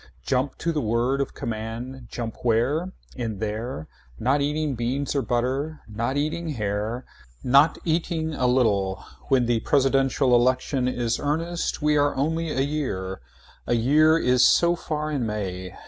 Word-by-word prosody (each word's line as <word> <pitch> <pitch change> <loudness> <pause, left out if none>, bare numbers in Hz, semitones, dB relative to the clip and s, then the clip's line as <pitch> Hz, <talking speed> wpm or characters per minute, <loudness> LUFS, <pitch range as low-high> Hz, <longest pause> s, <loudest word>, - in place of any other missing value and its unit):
Jump 130 +1 0
to 170 - -1
the 155 -2 -1
word 120 +5 +1
of 140 - -4
command. 120 +2 -5
Jump 115 -2 -5
where 130 +10 +1 0.2
In 115 -5 -3
there 110 -3 -4 0.3
Not 135 +5 +1
eating 150 0 0
beans 125 +4 -2
or 140 - +1
butter. 135 +6 -1
Not 115 +5 -2
eating 155 +3 -1
hair. 105 +3 -2 0.4
Not 140 +5 +5
eating 160 -1 -1
a 125 -3 +1
little 105 -6 +1 0.2
When 130 -3 +3
the 120 -1 +1
presidential 135 0 +2
election 130 +2 +2
is 120 -2 -1
earnest 165 +2 -2
we 150 0 +3
are 145 0 +2
only 160 +4 -1
a 135 -3 0
year. 130 - -3 0.5
A 120 - +2
year 155 +7 +4
is 125 -4 +3
so 170 0 +5
far 155 -2 -3
in 140 -4 -1
May. 95 -3 -4
130 Hz, 150 wpm, -25 LUFS, 115-150 Hz, 0.5 s, Not